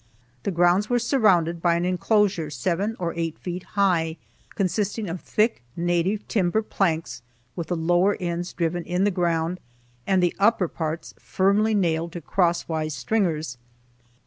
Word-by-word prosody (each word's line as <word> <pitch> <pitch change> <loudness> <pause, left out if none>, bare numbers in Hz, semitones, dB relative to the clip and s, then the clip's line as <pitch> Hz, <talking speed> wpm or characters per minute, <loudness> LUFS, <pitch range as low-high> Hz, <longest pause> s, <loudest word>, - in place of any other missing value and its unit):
The - - -2
grounds 175 +3 +3
were 245 - +3
surrounded 190 - +2
by 170 -1 +3
an 170 +1 0
inclosure 185 -2 +1
seven 190 +8 -1
or 170 -2 -2
eight 165 -1 -2
feet 180 0 -5 0.2
high, 170 -5 +2 0.4
consisting 200 +3 -1
of 175 +1 -5
thick, 220 - +1
native 175 +4 0
timber 205 +1 +1
planks 160 - -1 0.3
with 170 -2 -4
the 175 - -1
lower 175 +4 +2
ends 175 -1 -3
driven 170 0 -1
in 180 +2 0
the 205 - +3
ground, 170 -1 0 0.5
and 190 -2 +3
the 175 - +1
upper 205 -2 +3
parts 160 0 -4
firmly 205 +3 +2
nailed 170 -3 0
to 175 - -6
cross 170 +1 +1
wise 155 -2 -2
stringers. 155 - -1
175 Hz, 150 wpm, -24 LUFS, 165-200 Hz, 0.5 s, grounds